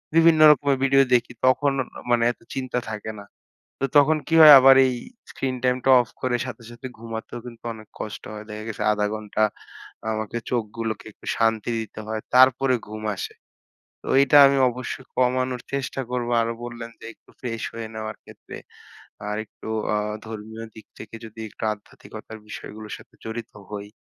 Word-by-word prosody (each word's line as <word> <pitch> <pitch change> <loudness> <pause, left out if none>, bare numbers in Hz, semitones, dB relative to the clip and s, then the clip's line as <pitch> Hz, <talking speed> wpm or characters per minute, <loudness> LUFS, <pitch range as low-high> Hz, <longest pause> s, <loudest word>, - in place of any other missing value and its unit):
বিভিন্ন 165 -1 +6
রকমের 140 -2 +2
ভিডিও 135 0 +5
দেখি 120 -1 +3
তখন 135 +2 +3
ন - - +3 0.3
মানে 120 -1 +4
এত - - -16
চিন্তা 130 -2 -2
থাকে 110 0 -5
না। - - -13 0.6
তো - - +3
তখন 150 +2 +5
কি 165 - +1
হয় 155 -2 +12
আবার 135 +1 +8
এই 130 - +1 0.4
স্ক্রিন 130 -1 -2
টাইমটা 125 +1 +1
অফ 120 - -8
করে 125 -1 +1
সাথে, 130 -2 -8
সাথে 120 +2 -8
ঘুমাতেও 115 +1 -6
কিন্তু 120 -2 -11
অনেক 110 -1 -13
কষ্ট 105 - -6
হয়। 105 0 -7
দেখা 105 0 -6
গেছে 110 - -4
আধা 105 0 +1
ঘন্টা 110 0 -3 0.7
আমাকে 110 +1 -3
চোখগুলোকে 115 -2 -3
একটু - - -19
শান্তি 115 0 +1
দিতে 110 -1 -7
হয়। 110 0 -2 0.2
তারপরে 130 +1 +5
ঘুম 110 +1 -7
আসে। - - -5 0.7
তো - - -12
এইটা 140 +1 +5
আমি 140 0 +3
অবশ্যই 130 +2 -6
কমানোর 125 0 +1
চেষ্টা 135 0 -2
করব। 125 -1 -2
আরো 115 0 -1
বললেন 120 -1 -7
যে - - -13
একটু - - -26
ফ্রেশ 115 -3 -4
হয়ে 115 -1 -5
নেওয়ার 110 0 -5
ক্ষেত্রে - - -12 0.7
আর 105 - -2
একটু - - -13 0.3
আ - - +2 0.3
ধর্মীয় 110 +1 -7
দিক 110 - -12
থেকে 110 - -9
যদি 110 0 -12
একটু - - -11
আধ্যাত্মিকতার 110 +1 -12
বিষয়গুলোর 110 0 -8
সাথে - - -18
জড়িত 110 +1 -5 0.2
হই 100 -1 -6
115 Hz, 170 wpm, -24 LUFS, 110-130 Hz, 0.7 s, হয়